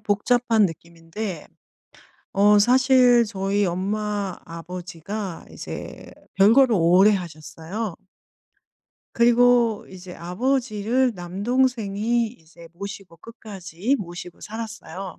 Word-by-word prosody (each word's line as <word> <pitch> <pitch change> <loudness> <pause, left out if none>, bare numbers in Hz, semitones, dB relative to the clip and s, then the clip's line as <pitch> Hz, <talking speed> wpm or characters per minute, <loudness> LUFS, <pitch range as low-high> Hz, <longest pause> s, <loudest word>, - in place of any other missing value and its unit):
복잡한 220 +1 +2
느낌인데 170 +2 -7 0.9
어 205 +1 +5
사실 250 0 +5
저희 200 -1 -1
엄마 200 +1 -2
아버지가 180 +3 -7
이제 - - -9 0.2
별거를 230 +4 +5
오래 180 +5 +5
하셨어요. 165 +3 -5 1.2
그리고 235 -2 +3
이제 185 -1 -11
아버지를 240 +5 0
남동생이 225 +4 0
이제 165 -6 -16
모시고 195 -1 -9
끝까지 205 - -4
모시고 175 -1 -8
살았어요. 215 -5 -7
205 Hz, 225 characters per minute, -23 LUFS, 180-230 Hz, 1.2 s, 어